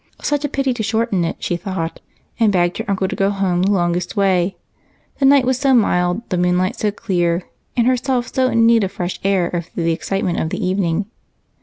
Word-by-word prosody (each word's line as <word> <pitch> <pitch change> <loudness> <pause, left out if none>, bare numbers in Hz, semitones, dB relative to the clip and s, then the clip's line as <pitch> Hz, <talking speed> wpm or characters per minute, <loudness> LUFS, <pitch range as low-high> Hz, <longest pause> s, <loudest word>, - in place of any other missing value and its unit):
Such 290 -1 -1
a 290 - -1
pity 275 -2 0
to 240 - -4
shorten 220 -3 0
it, - - -2
she 175 - -2
thought, 170 -3 -4 0.4
and 220 -3 +4
begged 175 -2 +1
her - - -3
uncle 195 -1 0
to - - -4
go 195 0 +1
home 195 -3 0
the 195 +2 +2
longest 180 0 0
way 190 -2 +2 0.6
the 275 - +3
night 275 -1 +5
was 255 0 +1
so 270 -2 +3
mild, 180 -1 +1
the 180 - 0
moonlight 180 +1 +1
so 210 - 0
clear, 175 -4 -1 0.3
and 235 - +3
herself 255 0 0
so 260 -1 +2
in 230 -2 +3
need 230 -2 +5
of 190 - -2
fresh 180 0 -4
air 190 -3 +1
after 170 0 -4
the 165 - +2
excitement 180 +1 -2
of 160 - -1
the - - -3
evening. 185 0 0
195 Hz, 210 wpm, -19 LUFS, 175-230 Hz, 0.6 s, night